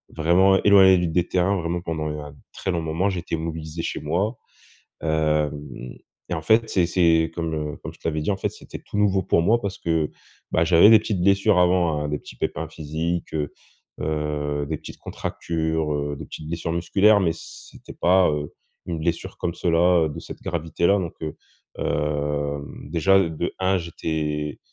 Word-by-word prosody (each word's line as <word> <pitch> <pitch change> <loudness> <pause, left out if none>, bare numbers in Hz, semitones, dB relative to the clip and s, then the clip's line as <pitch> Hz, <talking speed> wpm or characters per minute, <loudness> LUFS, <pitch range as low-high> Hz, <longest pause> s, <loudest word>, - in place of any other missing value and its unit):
vraiment 90 +4 +4
éloigné 95 -2 +7
des 85 +2 0
terrains 90 +2 +1
vraiment 85 0 -2
pendant 80 -3 -3
un 75 -1 -9 0.2
très 95 - -3
long 85 -2 -1
moment, 80 +5 0
j'étais 85 -2 -3
immobilisé 80 0 -5
chez - - -3
moi, 105 +7 -1 0.7
hem 75 -5 -1 0.3
et 85 - 0
en 80 - -3
fait, 110 +6 +3
c'est 90 -4 +2
c'est 85 -2 +3
comme, 80 -2 -2 0.2
heu, - - -8
comme - - -6
je - - -20
te - - -3
l'avais 80 -1 -1
dit, 75 - -1
en 100 - +1
fait, - - -1
c'était - - -10
tout - - -8
nouveau 100 -2 +3
pour 85 - +2
moi 115 +7 +3
parce 100 -3 -4
que, 80 -2 0 0.4
bah, 80 - +2
j'avais 85 +4 +7
des 110 0 +9
petites 105 -4 -2
blessures 100 +1 +4
avant, 90 -4 +3
hein, 75 - -2
des 75 - -1
petits - - -13
pépins - - -3
physiques, 80 +2 -3
heu 75 -2 -2 0.5
heu, 75 -1 -2
des 75 0 -3
petites - - -10
contractures, 80 -2 -2
heu, 75 0 -2
des - - -7
petites 75 - -9
blessures 85 0 -3
musculaires, 95 +5 +4
mais 85 -4 +2
c'était - - -12
pas, 90 0 +4
heu, 75 -1 -4 0.3
une 85 -2 -3
blessure 85 +1 -2
comme 85 - -2
cela 85 -1 +3
de 75 - -7
cette - - -10
gravité-là, 85 +4 +1
donc 85 -4 -3
heu, 80 -2 -4 0.4
hem, 75 -1 -2
déjà 95 +4 +4
de 80 +2 -3
1, 95 +1 +2
j'étais, 75 -3 -3
85 Hz, 180 wpm, -23 LUFS, 75-90 Hz, 0.7 s, des